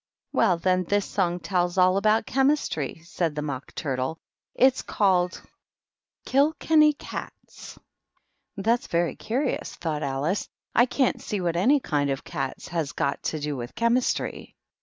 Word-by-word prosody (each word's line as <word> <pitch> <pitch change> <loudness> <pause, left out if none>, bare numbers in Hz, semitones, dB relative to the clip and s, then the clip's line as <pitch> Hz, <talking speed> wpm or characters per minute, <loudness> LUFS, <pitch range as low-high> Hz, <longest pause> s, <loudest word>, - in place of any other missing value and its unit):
Well, 185 -6 +3
then, 185 +1 +1
this 205 +2 +1
song 180 -3 0
tells 180 0 0
all 185 0 +5
about 215 +2 +3
Chem 270 +4 +3
istry," 160 - -2
said 170 -2 -2
the 150 - -2
Mock 140 -3 -6
Turtle; 135 +2 -2 0.2
" - - -59
it's 265 -1 +3
called 185 -3 +1 0.5
' - - -62
KiU 285 +4 +3
kenny 305 -1 +5
Cats.' - - -9 0.4
" - - -47
That's 230 +5 +1
very 170 0 0
curious," 255 +4 -2
Alice 150 +2 -1
thought. - - -28
" - - -47
I 245 - +5
can't 260 0 +1
see 205 - -3
what 170 -2 -1
any 250 +12 +4
kind 145 - 0
of 135 0 -2
cats 135 -1 -5
has 165 -5 -2
got 140 - -1
to 155 - -1
do 150 0 -3
with 120 -1 -7
Chemistry." 235 +2 0
180 Hz, 165 wpm, -26 LUFS, 150-230 Hz, 0.5 s, all